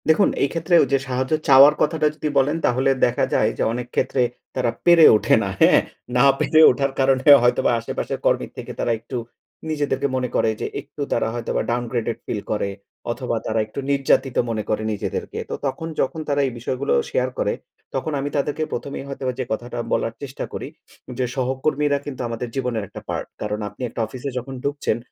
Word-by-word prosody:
দেখুন 160 +6 +5
এই 140 - +2
ক্ষেত্রে 165 +1 -2
ওই - - -1
যে - - +6
সাহায্য 130 +2 -1
চাওয়ার 140 +1 +8
কথাটা 155 0 +2
যদি 155 0 -2
বলেন 145 +4 +3
তাহলে 130 +2 +2 0.2
দেখা 120 - +1
যায় - - +3
যে, - - 0
অনেক 125 0 -4
ক্ষেত্রে 130 - +1 0.3
তারা 120 - +1
পেরে 170 -2 +8
ওঠে 105 - +3
না। 100 - -2
হ্যাঁ? - - +6 0.4
না 125 - +5
পেরে 155 - +3
ওঠার 135 +2 -1
কারণে 135 -1 +2 0.2
হয়তোবা 120 0 +3
আশেপাশের 115 - -4
কর্মীর - - +1
থেকে - - -6
তারা - - +1
একটু 125 +3 -6 0.5
নিজেদেরকে 145 -3 0
মনে 125 -1 -1
করে - - +3
যে, - - -1
একটু 150 - -11
তারা 115 - +1
হয়তোবা 120 -1 -2
ডাউনগ্রেডেড 120 -1 -2
ফিল 105 - -3
করে 105 -2 0 0.4
অথবা 125 0 -3
তারা 110 0 0
একটু 110 +5 -7
নির্যাতিত 135 -2 +2
মনে 110 -2 -2
করে 110 0 0
নিজেদেরকে। 105 - -4
তো - - -2
তখন 160 +4 -4
যখন 145 +4 -1
তারা 145 0 +2
এই - - -3
বিষয়গুলো 130 +3 -1 0.2
শেয়ার - - 0
করে - - +1 0.4
তখন 135 +4 -2
আমি 140 +1 -2
তাদেরকে 145 +2 -1
প্রথমেই 140 +3 -4
হয়তোবা 135 -2 -3
যে 130 - -1
কথাটা 120 +2 -3
বলার 115 - 0
চেষ্টা 140 -2 -5
করি - - -5 0.5
যে, 130 - +1
সহকর্মীরা 140 +3 0
কিন্তু 135 -3 -6
আমাদের 115 +1 -4
জীবনের 125 -5 -1
একটা - - -10
পার্ট। - - -3
কারণ 105 0 -2
আপনি 105 - -16
একটা 115 - -4
অফিসে 130 +4 -6
যখন 130 +2 -5
ঢুকছেন, 140 -5 -1
130 Hz, 190 wpm, -22 LUFS, 120-140 Hz, 0.5 s, চাওয়ার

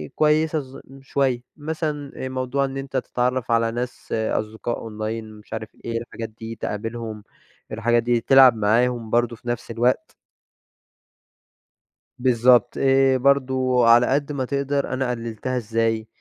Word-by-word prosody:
كويسة 155 +1 +2
ز 135 -1 -10 0.2
شوية، 135 -2 0 0.2
مثلًا 150 -2 -4 0.2
موضوع 130 +1 -1
إن 135 0 -5
أنتَ 135 0 -4
تتعرَّف 125 -1 -1
على 115 0 +2
ناس، 125 +1 -6
أصدقاء 110 +1 -2
أونلاين 110 0 -5
مش 105 - -13
عارف 110 -1 -5 0.2
إيه 115 0 -2
الحاجات 115 -1 -7
دي، 110 +1 -8
تقابلهم 110 0 -5 0.5
الحاجات 120 +1 +1
دي، 120 0 +1
تلعب 130 0 +7
معاهم 115 +2 +1
برضه 120 +1 +1
في 120 - -16
نفس 120 -1 -3
الوقت. 120 +2 0 2.1
بالضبط، 125 -1 +4
آآ 135 -1 +4
برضه 130 -2 +2
على 120 +1 +6
قد 140 +2 0
ما 135 -3 -2
تقدر 140 +1 -1
أنا 130 -1 -1
قلِّلتها 115 +1 -4
إزاي؟ 115 -1 -1
120 Hz, 135 wpm, -23 LUFS, 115-135 Hz, 2.1 s, تلعب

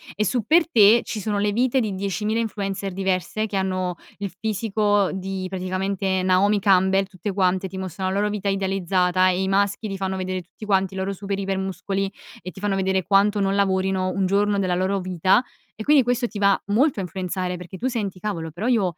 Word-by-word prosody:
e 210 - +1
su 225 +4 0
per 330 +1 +4
te 220 -2 +6
ci 215 - -5
sono 205 0 -2
le 205 0 +1
vite 250 +4 +2
di 215 -3 -2
10.000 205 +3 -1
influencer 200 -3 -3
diverse, 190 +3 -1
che 200 - -3
hanno 185 -2 -1 0.2
il 200 - -3
fisico 210 -2 +1
di, 190 0 -4
praticamente, 190 0 -1
Naomi 195 +3 +3
Campbell, 190 0 +4
tutte 195 +1 -6
quante, 190 0 +1
ti 190 - -8
mostrano 190 0 -3
la 200 - 0
loro 210 - +1
vita 205 -1 -3
idealizzata 190 -1 +1
e 185 0 +1
i 190 - -1
maschi 200 +2 +1
ti 195 - -4
fanno 190 0 -2
vedere, 185 0 -3
tutti 180 - -16
quanti, 195 -2 +1
i 190 - -7
loro 190 +1 -2
super 195 0 -4
iper 195 -1 -2
muscoli, 195 +1 -2 0.3
e 185 +2 -7
ti 190 - -12
fanno 205 -2 0
vedere 190 0 +1
quanto 205 +2 +3
non 195 0 +1
lavorino 190 -1 +1
un 195 0 0
giorno 200 +2 +2
della 185 -2 0
loro 190 +2 0
vita, 185 +5 +2 0.3
e 220 - -6
quindi 290 0 +5
questo 245 0 0
ti 215 - -7
va 200 -1 +4
molto 235 +3 +2
a - - -1
influenzare, 180 0 -3
perché 180 +2 -9
tu: 255 - -2
"Senti 205 -7 -3
cavolo, 165 -6 -3
però 185 +9 -4
io 235 -5 +3
195 Hz, 210 wpm, -23 LUFS, 185-205 Hz, 0.3 s, te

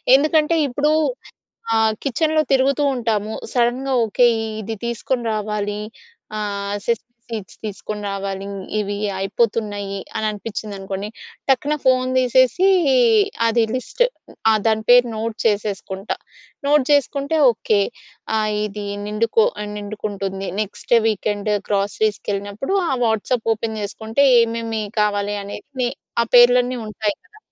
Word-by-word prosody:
ఎందుకంటే, 305 +3 +3
ఇప్పుడూ 290 +4 +1 0.8
ఆహ్, 220 -1 +3
కిచెన్‌లో 310 +3 +2
తిరుగుతూ 270 +2 +3
ఉంటాము. 220 -3 -1 0.2
సడెన్‌గా 250 +2 +1
ఓకే, 235 +3 +3 0.3
ఇది 220 +1 -5
తీసుకొని 235 +1 -2
రావాలి. 210 -1 -2 0.6
ఆహ్, 200 -1 -3
సెసమీ 235 -1 0 0.3
సీడ్స్ 215 -4 -6
తీసుకొని 210 0 -5
రావాలి. 195 0 -4 0.3
ఇవి 205 -1 -1 0.2
అయిపోతున్నాయి, 205 0 -1 0.2
అని 220 - -1
అనిపించింది 210 0 -5
అనుకోండి. 195 +1 -5 0.4
టక్కున 275 +3 +2
ఫోన్ 255 -1 +3
దీసేసీ, 255 - +4 0.8
అది 230 0 +3
లిస్ట్ 255 - -6 0.5
ఆహ్, 215 -1 +3
దాని 220 -1 +2
పేరు 245 0 +7
నోట్ 220 0 -3
చేసేసుకుంట. 200 -2 -1 0.6
నోట్ 290 -2 +4
చేసుకుంటే 285 +2 +1
ఓకే. 220 -2 +1 0.6
ఆహ్, 215 -1 +1
ఇది 210 0 -5 0.2
నిండుకొ 230 - +2 0.2
ఆహ్, 210 - -5
నిండుకుంటుంది. 200 -2 -4
Next 210 +3 -2
weekend 210 0 -1 0.2
గ్రోసరీస్‌కెళ్ళినప్పుడు. 205 - -1 0.2
ఆ - - +1
వాట్సాప్ 225 +1 0
ఓపెన్ 220 0 -4
జేసుకుంటే, 220 +6 0 0.2
ఏమేమి 230 -1 -1 0.2
కావాలి 205 0 0
అన్నిట్ని 245 +5 -4 0.3
ఆ - - +1
పేర్లన్నీ 245 +1 +6
ఉంటాయి 210 -1 -2
కదా. 425 - -20
220 Hz, 115 wpm, -21 LUFS, 205-250 Hz, 0.8 s, పేరు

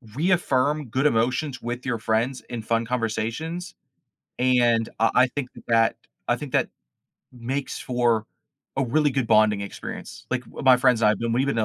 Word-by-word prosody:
reaffirm 150 -3 +1
good 130 +5 -1
emotions 130 +2 +1
with 120 +2 -5
your 120 -4 -1
friends 115 +4 0
in 120 -2 -5
fun 115 +1 0
conversations, 125 - -3 0.6
and 120 -3 +3
uh, 115 0 +3
I 125 - +6
think 130 0 -5 0.2
that 115 -1 +3 0.3
I - - +4
think - - -8
that - - +1 0.6
makes 130 +3 -4
for 120 -3 0 0.5
a 135 - +1
really 145 +4 +2
good 130 -2 -1
bonding 110 -2 +4
experience, 100 - -8
like, 125 -1 -1
w 115 - -10
my 130 -2 +7
friends 125 -2 +3
and 105 - +5
I've 105 - -1
been 115 0 -1
we've 130 +4 +1
been 140 - 0
to 110 - +2
125 Hz, 175 wpm, -24 LUFS, 115-135 Hz, 0.6 s, my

